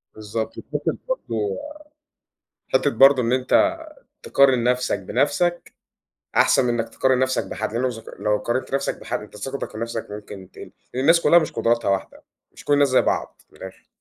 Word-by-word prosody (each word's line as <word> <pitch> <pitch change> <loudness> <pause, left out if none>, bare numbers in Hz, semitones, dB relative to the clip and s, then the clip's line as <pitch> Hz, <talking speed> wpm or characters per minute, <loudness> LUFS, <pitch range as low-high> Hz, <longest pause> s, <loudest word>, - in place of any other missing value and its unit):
بالضبط 110 +1 -4 0.2
حتة - - 0 0.2
برضو 110 - -2 1.2
حتّة - - +3
برضو 135 -1 +6
إن 120 +1 0
أنت 130 - +3 0.5
تقارن 130 -4 +3
نفسك 125 -4 +1
بنَفْسك، 160 - -1 0.6
أحسن 125 - +4
منك 120 -1 -1
تقارن 130 -1 +1
نَفْسك 130 0 0
بحد، 110 0 -4
لأنه 120 +2 -1
لو 130 - +2
زك 115 -2 -8 0.2
لو 105 0 +1
قارنت 120 +5 -3
نَفْسك - - -2
بحد - - -4
أنت - - -12
ثقتك 135 +6 -5
في - - -9
نَفْسك 115 0 -4
ممكن 105 -2 -10
تقل، - - -11 0.2
الناس 165 +6 +4
كلها 170 - +6
مش 155 - -3
قدراتها 115 -1 0
واحدة، 95 -1 -3 0.3
مش - - -15
كل 145 - +2
الناس 145 0 +4
زي 130 - +4
بعض، - - -2
من - - -20
الآخر. 95 0 -11
125 Hz, 170 wpm, -22 LUFS, 110-135 Hz, 1.2 s, برضو